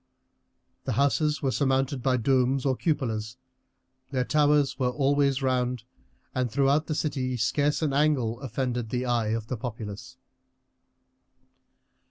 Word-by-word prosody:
The - - -1
houses 150 +2 +1
were 135 - +1
surmounted 135 +2 0
by 130 0 +2
domes 130 +2 +1
or 135 -1 +2
cupolas. 115 -7 -2 0.7
Their 130 -2 0
towers 145 -2 +2
were 125 -1 +2
always 140 0 +1
round, 125 -2 0 0.5
and 125 -1 0
throughout 140 +4 +2
the 155 - -2
city 130 -5 -1
scarce 145 +7 +1
an 145 -3 0
angle 135 -6 +1
offended 125 -2 -3
the 125 +1 -2
eye 120 -3 +1
of 110 0 -2
the 125 +2 -4
populace. 115 +2 -7
130 Hz, 130 wpm, -27 LUFS, 120-140 Hz, 0.7 s, by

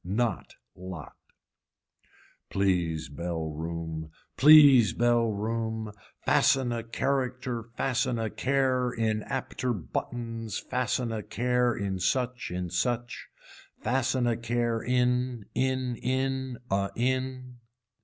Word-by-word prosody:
Knot 110 +6 -2 0.2
lot. 90 -5 -8 1.3
Please 90 -6 0
bell 80 +2 -4
room 80 0 -5 0.3
please 140 -7 +8
bell 120 -1 +3
room 110 +1 -2 0.3
fasten 130 -3 +3
a 120 -1 -2
character 125 -1 -2
fasten 130 -2 0
a 110 -2 -2
care 130 -2 +1
in 110 -2 0
apter 130 0 -2
buttons 115 +3 -4
fasten 125 -1 -1
a 110 -1 -3
care 120 +3 +1
in 95 -2 -2
such, 125 +4 0
in 90 -1 -4
such. 120 +5 -2 0.6
Fasten 125 +1 +1
a 120 -1 +2
care 115 0 -1
in, 125 -2 0
in 130 -1 0
in 130 0 -1
a 100 0 +1
in. 130 0 -2
120 Hz, 105 wpm, -28 LUFS, 105-125 Hz, 1.3 s, please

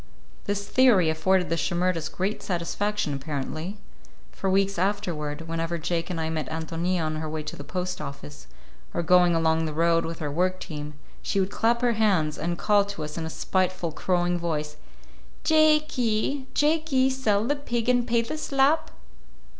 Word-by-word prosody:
This 200 -1 -2
theory 215 -11 +5
afforded 180 +3 +2
the 165 - +1
Shimerdas 175 -2 0
great 195 +4 -2
satisfaction, 190 0 -1
apparently. 150 +7 -4 0.5
For 195 - -2
weeks 195 -1 +2
afterward, 175 -6 -1
whenever 165 +1 -2
Jake 170 +1 -2
and 175 -3 -3
I 160 - -1
met 155 -4 -3
Ántonia 165 +2 -2
on 155 0 -2
her 155 0 -4
way 155 0 -4
to 150 - -6
the 145 - -8
post 180 +2 -4
office, 145 0 -8 0.5
or 170 - 0
going 175 0 +5
along 160 0 +2
the 155 -1 -4
road 165 +1 +3
with 165 0 -5
her 150 -2 -3
work 185 +4 0
team, 150 -3 -7 0.3
she 200 - -1
would 190 +1 0
clap 235 +2 +1
her 240 -1 +3
hands 190 -9 +1
and 170 +1 -2
call 205 +1 +3
to 200 -6 -6
us 150 0 -6
in 160 -1 -3
a - - -4
spiteful, 185 0 -1
crowing 175 +1 0
voice:— 155 -3 -2 0.7
"Jake 310 -1 +4
y, 250 +3 0
Jake 310 +2 +2
y, 260 -1 +4
sell 225 -6 +1
the 290 +4 +1
pig 240 -5 -3
and 245 -1 +3
pay 235 -1 +2
the 310 +7 -5
slap!" 280 +2 +2
180 Hz, 180 wpm, -26 LUFS, 160-215 Hz, 0.7 s, theory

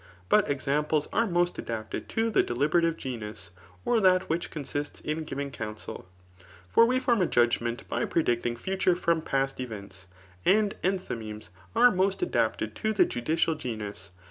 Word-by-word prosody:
But - - +4
examples 145 +2 0
are 230 - +2
most 175 -1 +1
adapted 110 -1 -5
to 225 0 0
the - - +4
deliberative 160 +7 +1
genus, 105 -7 -6 0.3
or 235 - +3
that 185 -2 +4
which 170 +2 -1
consists 145 -1 -4
in 155 +1 -3
giving 140 -1 -4
counsel. 110 -5 -7 0.6
For 230 - +5
we 255 +1 +2
form 240 -5 +2
a 180 - +3
judg 120 -1 +3
ment 120 0 -4
by - - -1
predicting 120 -6 0
future 185 +7 +1
from 170 -2 +1
past 135 -3 -1
events. 100 -7 -7 0.4
And 210 +1 +3
en 190 +1 +2
tliymemes 110 - -7 0.3
are 245 +2 +7
most 190 - +1
adapted 360 - 0
to 220 0 0
the 205 - +5
judicial 160 +7 0
genus. 105 - -6
150 Hz, 160 wpm, -28 LUFS, 120-185 Hz, 0.6 s, are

